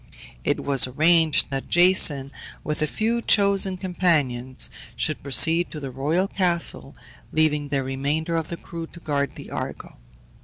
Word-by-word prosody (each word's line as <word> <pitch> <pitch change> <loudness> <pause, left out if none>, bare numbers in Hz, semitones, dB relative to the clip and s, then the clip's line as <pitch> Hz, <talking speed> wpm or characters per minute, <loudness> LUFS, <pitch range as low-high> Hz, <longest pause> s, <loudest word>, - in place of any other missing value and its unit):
It - - -1
was 135 -3 +4
arranged 155 +3 +3
that 135 -1 -4
Jason, 165 -6 +4 0.3
with 150 0 -3
a 155 - +1
few 230 +7 -1
chosen 200 -3 +2
companions, 150 -9 -1 0.2
should - - -2
proceed 160 +6 +3
to 155 - -8
the 135 -2 -6
royal 155 +9 -1
castle, 175 -4 0 0.4
leaving 150 -2 +1
the 140 -1 -1
remainder 145 +5 -2
of 165 -1 -2
the 170 - -6
crew 165 -1 -8
to 170 - -14
guard 140 -3 -2
the - - -11
Argo. - - -7
155 Hz, 150 wpm, -23 LUFS, 140-175 Hz, 0.4 s, was